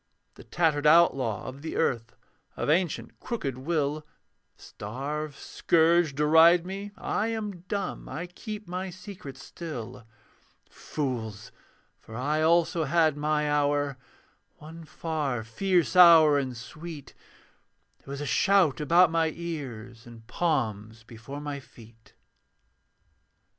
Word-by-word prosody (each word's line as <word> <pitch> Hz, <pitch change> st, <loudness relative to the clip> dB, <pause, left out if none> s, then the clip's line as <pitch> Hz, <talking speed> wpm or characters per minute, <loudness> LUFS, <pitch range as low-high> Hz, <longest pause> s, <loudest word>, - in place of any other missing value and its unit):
The -, -, -14 dB
tattered 155 Hz, -3 st, +1 dB
outlaw 135 Hz, -9 st, +4 dB
of 130 Hz, +2 st, -8 dB
the 160 Hz, -, -6 dB
earth, 115 Hz, -7 st, -1 dB, 0.4 s
Of -, -, 0 dB
ancient 175 Hz, 0 st, -1 dB
crooked 140 Hz, -, -4 dB
will; 150 Hz, 0 st, -1 dB, 0.5 s
Starve, 140 Hz, +7 st, -6 dB
scourge, 165 Hz, -2 st, +2 dB
deride 160 Hz, +4 st, +5 dB
me: 195 Hz, +2 st, -6 dB
I 215 Hz, -, -1 dB
am 215 Hz, -5 st, -4 dB
dumb, 200 Hz, -2 st, -4 dB
I 165 Hz, +4 st, -5 dB
keep 210 Hz, +3 st, -8 dB
my 185 Hz, +2 st, -4 dB
secret 180 Hz, -7 st, -10 dB
still. 125 Hz, -7 st, -8 dB, 0.6 s
Fools! 115 Hz, -7 st, -5 dB, 0.5 s
For 110 Hz, -, -12 dB
I 145 Hz, +6 st, -1 dB
also 165 Hz, 0 st, +2 dB
had 160 Hz, 0 st, +2 dB
my 150 Hz, 0 st, 0 dB
hour; 145 Hz, -2 st, 0 dB, 0.6 s
One 160 Hz, +2 st, -11 dB
far 150 Hz, -8 st, -3 dB
fierce 180 Hz, -, 0 dB
hour 165 Hz, -5 st, +8 dB
and 130 Hz, -3 st, -4 dB
sweet: 155 Hz, +5 st, -9 dB, 0.9 s
There -, -, -17 dB
was 140 Hz, +1 st, -5 dB
a -, -, -3 dB
shout 175 Hz, -, +3 dB
about 170 Hz, +3 st, +5 dB
my 165 Hz, -1 st, +1 dB
ears, 125 Hz, -9 st, -7 dB
And 115 Hz, -1 st, -13 dB
palms 115 Hz, -, -2 dB
before 120 Hz, +5 st, -9 dB
my 145 Hz, -1 st, -5 dB
feet. 115 Hz, -3 st, -18 dB
150 Hz, 120 wpm, -27 LUFS, 130-170 Hz, 0.9 s, hour